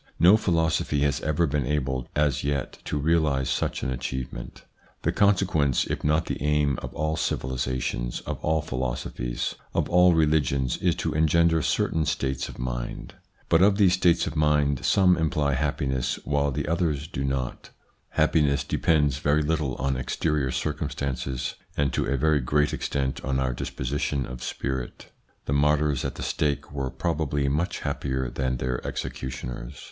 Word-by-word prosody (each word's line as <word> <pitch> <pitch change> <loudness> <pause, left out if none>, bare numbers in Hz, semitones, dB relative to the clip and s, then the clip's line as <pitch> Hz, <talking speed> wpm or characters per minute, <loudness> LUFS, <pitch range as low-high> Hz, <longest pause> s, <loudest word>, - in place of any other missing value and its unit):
No 90 +5 +8
philosophy 80 -7 +1
has 70 +2 +1
ever 75 +2 +1
been 70 -4 -1
able 65 -4 -1
as 75 -3 +1
yet 70 -2 -2
to 75 - -2
realise 75 -3 +1
such - - -1
an 65 - -1
achievement. 65 -1 -5 0.4
The - - +2
consequence, 95 -9 +2
if - - -4
not 75 +2 +2
the - - -4
aim, 75 -2 +2
of - - -6
all 80 +1 0
civilisations, 65 -3 -2
of - - -6
all 80 0 +1
philosophies, 60 -3 -3 0.2
of - - +1
all 90 0 +6
religions 75 -5 +2
is - - +1
to - - -2
engender 80 +1 +3
certain 80 +1 0
states 65 0 -1
of - - -10
mind. - - -4 0.3
But 85 +1 +4
of 100 +1 +5
these 95 -4 +5
states 90 -2 +3
of - - -4
mind 75 -3 +2
some 90 -2 +4
imply 75 -3 +1
happiness, 65 -2 -1
while 70 0 +1
the 70 - -3
others 80 -3 0
do 70 -5 -4
not 65 -2 -3 0.4
Happiness 75 -3 +2
depends 75 -4 +1
very 75 +1 +2
little 75 -3 0
on 65 0 -1
exterior 70 +2 0
circum - - -2
stances, 65 -1 -3 0.2
and 70 -3 +1
to - - 0
a 70 - +1
very 75 +1 +3
great 75 +4 +1
extent 70 -1 -2
on 65 0 0
our 65 -2 0
disposition 70 +2 -2
of 60 0 -8
spirit. 65 0 -4 0.3
The 70 - -1
martyrs 75 -1 +2
at - - -3
the - - -6
stake 75 -3 -1
were 70 -2 -3
probably 75 -2 -1
much 75 +6 -1
happier 65 -2 -2
than 65 -1 -1
their 65 0 -2
executioners. 60 0 -5
70 Hz, 160 wpm, -26 LUFS, 65-80 Hz, 0.4 s, No